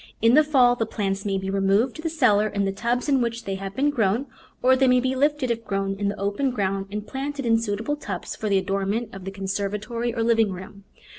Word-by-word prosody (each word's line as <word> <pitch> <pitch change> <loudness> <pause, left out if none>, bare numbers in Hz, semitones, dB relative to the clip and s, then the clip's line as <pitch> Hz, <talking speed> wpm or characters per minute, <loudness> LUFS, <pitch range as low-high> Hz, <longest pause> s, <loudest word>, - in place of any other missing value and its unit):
In 230 +2 +4
the 305 +3 +7
fall 260 -5 +4
the 225 -2 -2
plants 200 -2 -2
may 195 -1 0
be 190 0 -3
re 195 - 0
moved 200 +6 +2
to 315 - -7
the 325 - -2
cellar 220 -10 +3
in 200 -1 -1
the 195 - 0
tubs 235 +6 -1
in 275 -3 +3
which 235 0 -2
they 195 - -3
have 195 0 -6
been 285 +4 +2
grown, 230 -1 +1 0.4
or 260 +1 +6
they 265 0 +3
may 250 0 +5
be 260 +1 0
lifted, 290 -2 +1
if 230 0 -2
grown 195 -2 -1
in 205 - 0
the 205 - -5
open 205 +7 0
ground, 195 -5 -1
and 210 +1 -5
planted 275 +2 -4
in 225 -1 +3
suitable 225 +5 -2
tubs 200 -11 -6
for 215 - -3
the 200 - +3
adornment 195 +4 -1
of 195 -1 -9
the 195 - -4
conservatory 205 +5 -3
or 230 -1 -1
living 225 -3 +3
room. 190 +2 -9
220 Hz, 245 wpm, -24 LUFS, 195-250 Hz, 0.4 s, the